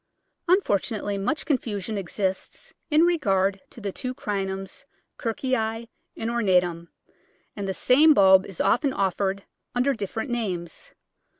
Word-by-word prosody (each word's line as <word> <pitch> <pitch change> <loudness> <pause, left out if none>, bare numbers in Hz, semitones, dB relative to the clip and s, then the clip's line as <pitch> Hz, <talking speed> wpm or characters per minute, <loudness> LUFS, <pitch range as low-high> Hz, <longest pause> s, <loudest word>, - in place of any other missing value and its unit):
Unfortunately 210 - +1
much 195 +10 -1
confusion 220 - -2
exists 190 0 -3 0.2
in 310 +1 +5
regard 195 - +2
to - - -13
the 200 -3 -4
two 255 +5 -5
Crinums, 195 0 -4 0.4
Kirkii 255 +3 -1 0.6
and 225 - -2
ornatum, 180 -7 +1 0.7
and 200 -2 -4
the 190 - -1
same 295 - +5
bulb 190 -1 +6
is 195 - -10
often 270 +3 +2
offered 195 -1 -1 0.3
under 255 +3 +2
different 220 +3 -4
names. 210 - -4
205 Hz, 120 wpm, -25 LUFS, 190-250 Hz, 0.7 s, bulb